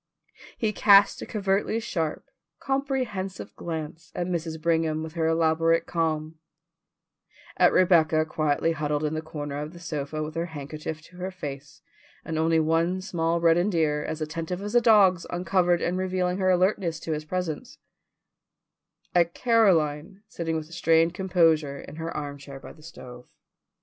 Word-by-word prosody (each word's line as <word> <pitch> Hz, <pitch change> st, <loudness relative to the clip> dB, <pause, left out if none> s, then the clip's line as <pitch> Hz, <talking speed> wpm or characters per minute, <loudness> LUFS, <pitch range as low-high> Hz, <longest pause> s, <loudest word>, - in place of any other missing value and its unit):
He 215 Hz, -2 st, 0 dB
cast 200 Hz, -1 st, +5 dB
a -, -, -6 dB
covertly 200 Hz, +1 st, 0 dB
sharp, 165 Hz, -9 st, -3 dB, 0.3 s
comprehensive 265 Hz, -9 st, -3 dB
glance 160 Hz, 0 st, -6 dB
at 175 Hz, -, -1 dB
Mrs. 165 Hz, -2 st, -3 dB
Brigham 160 Hz, -1 st, 0 dB
with 160 Hz, -1 st, -7 dB
her 165 Hz, -2 st, 0 dB
elaborate 165 Hz, 0 st, +2 dB
calm; 160 Hz, -1 st, -2 dB, 1.2 s
at -, -, +5 dB
Rebecca 160 Hz, -4 st, +4 dB
quietly 155 Hz, +1 st, 0 dB
huddled 150 Hz, -1 st, -1 dB
in 150 Hz, 0 st, -1 dB
the 155 Hz, -, -2 dB
corner 145 Hz, -3 st, -6 dB
of 150 Hz, +3 st, -6 dB
the 175 Hz, -, -11 dB
sofa 155 Hz, -2 st, -4 dB
with 155 Hz, 0 st, -6 dB
her 165 Hz, +1 st, -2 dB
handkerchief 155 Hz, 0 st, -6 dB
to 180 Hz, +2 st, -17 dB
her 185 Hz, +1 st, -4 dB
face 145 Hz, -5 st, -8 dB, 0.4 s
and 160 Hz, -1 st, -3 dB
only 160 Hz, 0 st, +3 dB
one 165 Hz, +3 st, +1 dB
small 170 Hz, -3 st, -1 dB
reddened 170 Hz, +3 st, +3 dB
ear 150 Hz, -2 st, +1 dB
as 155 Hz, -, -5 dB
attentive 165 Hz, +3 st, -4 dB
as 205 Hz, -, -5 dB
a 240 Hz, -, +5 dB
dog's 200 Hz, -6 st, +5 dB
uncovered 175 Hz, 0 st, +1 dB
and 180 Hz, +1 st, -1 dB
revealing 185 Hz, 0 st, -1 dB
her 185 Hz, -1 st, +2 dB
alertness 180 Hz, -2 st, +1 dB
for 160 Hz, -, -1 dB
his 155 Hz, 0 st, -3 dB
presence; 175 Hz, -2 st, -4 dB, 1.4 s
at 170 Hz, -1 st, +2 dB
Caroline 190 Hz, -6 st, +2 dB
sitting 165 Hz, -5 st, -3 dB
with 155 Hz, -1 st, -4 dB
a 165 Hz, -, -14 dB
strained 165 Hz, 0 st, +3 dB
composure 165 Hz, -6 st, +2 dB
in 150 Hz, -, -10 dB
her 165 Hz, 0 st, -4 dB
armchair 140 Hz, -2 st, -7 dB
by -, -, -11 dB
the 155 Hz, -, -19 dB
stove. 125 Hz, -6 st, -12 dB
165 Hz, 155 wpm, -26 LUFS, 155-185 Hz, 1.4 s, cast